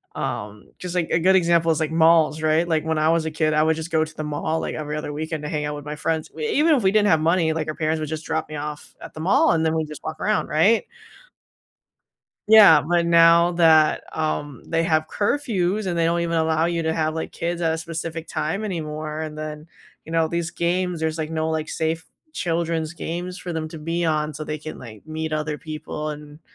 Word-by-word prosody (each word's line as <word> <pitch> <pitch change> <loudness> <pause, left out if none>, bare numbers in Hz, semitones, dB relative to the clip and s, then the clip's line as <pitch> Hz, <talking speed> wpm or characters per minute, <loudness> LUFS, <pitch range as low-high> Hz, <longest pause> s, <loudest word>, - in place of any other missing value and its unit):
Um, 105 +1 -5
just 180 -1 -6
like, 170 -3 0
a 165 - +3
good 190 +3 +4
example 170 -2 +3
is 160 - 0
like 155 0 -1
malls, 160 -1 +4
right, 155 +2 +2
like, 160 -2 0
when 160 0 0
I 155 +1 +2
was 165 -1 +2
a 160 - -2
kid, 155 0 0
I 150 - +3
would 160 0 +2
just 160 +1 -6
go 160 -1 +2
to 155 0 -13
the 155 - -4
mall, 155 +2 -2
like, - - -3
every 150 -1 -4
other 150 - -4
weekend 155 0 -4
to 150 - -4
hang 150 -1 -2
out 150 0 -3
with 145 - -8
my 150 0 -5
friends, 160 0 -2
w 155 -1 -4
even 310 +2 +3
if 250 - 0
we 190 - +4
didn't 210 0 +3
have 160 - +4
money, 165 0 +2
like, 155 -1 -3
our 155 - -3
parents 155 0 -1
would 155 - -3
just 160 0 -5
drop 160 0 -2
me 155 - -6
off 150 0 -7
at - - -10
the - - -9
mall 180 +5 +4
and 160 -1 +1
then 160 0 +1
we 160 - 0
just 150 -1 -10
walk 155 0 -5
around, 215 0 +1
right? 200 +9 +3 1.6
Yeah, 210 -8 +9
but 170 +2 +1
now 170 +1 +6
that, 160 -3 +4
um, 145 -4 -3
they 165 0 0
have 155 -2 +1
curfews 210 -5 0
and 175 -2 -1
they 165 - +2
don't 170 +1 +1
even 170 0 -1
allow 160 0 +1
you 170 -1 0
to 160 0 0
have, 155 -1 -1
like, 160 - -4
kids 170 +1 -3
at 165 -2 +1
a 160 - -2
specific 165 0 -5
time 160 +7 -2
anymore, 155 -4 -4
and 155 -1 -6
then, 155 +1 -7 0.4
you - - -11
know, 165 -1 +2
these 170 +1 -2
games, 175 +1 -1
there's, 160 0 -2
like, 155 0 -3
no, 160 0 -1
like, 160 -1 -2
safe 160 0 -2 0.3
children's 165 - -2
games 175 +2 -5
for 180 - -6
them 160 -1 -3
to 160 - -9
be 165 +3 -2
on, 155 -2 0
so 155 - -6
they 155 0 -4
can, 155 +1 -8
like, 110 -1 -12
meet 160 0 -4
other 155 0 -2
people 155 0 -6
and 150 0 -10
160 Hz, 240 wpm, -23 LUFS, 155-170 Hz, 1.6 s, Yeah